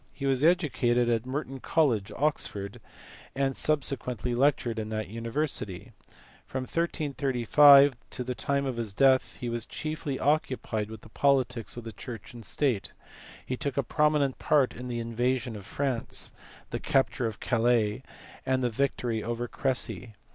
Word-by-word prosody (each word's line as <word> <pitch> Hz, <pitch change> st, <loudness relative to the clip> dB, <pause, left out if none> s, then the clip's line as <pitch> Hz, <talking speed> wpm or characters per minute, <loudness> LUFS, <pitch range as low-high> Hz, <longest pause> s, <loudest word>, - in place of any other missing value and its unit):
He 140 Hz, -, -5 dB
was 135 Hz, 0 st, +2 dB
educated 130 Hz, -8 st, +3 dB
at 115 Hz, +1 st, 0 dB
Merton 135 Hz, 0 st, -4 dB
College, 125 Hz, -10 st, +1 dB
Oxford, 105 Hz, -9 st, -2 dB, 0.5 s
and 135 Hz, -1 st, 0 dB
subsequently 125 Hz, -5 st, 0 dB
lectured 120 Hz, -3 st, +1 dB
in 110 Hz, 0 st, -4 dB
that 110 Hz, -2 st, -3 dB
university. 115 Hz, -3 st, -3 dB, 0.6 s
From 130 Hz, -1 st, -3 dB
1335 140 Hz, -3 st, +4 dB
to 125 Hz, -, -4 dB
the 125 Hz, +1 st, -3 dB
time 140 Hz, +2 st, -1 dB
of 130 Hz, -3 st, -3 dB
his 110 Hz, -4 st, -4 dB
death 135 Hz, 0 st, +4 dB
he 125 Hz, -, -4 dB
was 120 Hz, -1 st, -3 dB
chiefly 155 Hz, -3 st, -4 dB
occupied 130 Hz, -7 st, 0 dB
with 110 Hz, -1 st, -9 dB
the 115 Hz, -, -15 dB
politics 125 Hz, -3 st, +1 dB
of 120 Hz, -, -6 dB
the 115 Hz, -, -7 dB
church 115 Hz, +2 st, -9 dB
and 120 Hz, -1 st, -10 dB
state: 120 Hz, 0 st, -1 dB, 0.5 s
he 130 Hz, -, -2 dB
took 140 Hz, +1 st, -3 dB
a 140 Hz, -, +2 dB
prominent 150 Hz, 0 st, +1 dB
part 145 Hz, -4 st, +3 dB
in 125 Hz, +1 st, -7 dB
the 120 Hz, -1 st, -3 dB
invasion 120 Hz, +1 st, -1 dB
of 100 Hz, -1 st, -9 dB
France, 130 Hz, -1 st, -2 dB, 0.4 s
the -, -, -2 dB
capture 135 Hz, -2 st, +1 dB
of 110 Hz, -, -6 dB
Calais, 120 Hz, -2 st, +1 dB, 0.4 s
and 130 Hz, 0 st, 0 dB
the 120 Hz, -, +1 dB
victory 120 Hz, -2 st, -1 dB
of 120 Hz, +1 st, -3 dB
Cressy. 125 Hz, -4 st, -2 dB
125 Hz, 155 wpm, -28 LUFS, 115-140 Hz, 0.6 s, 1335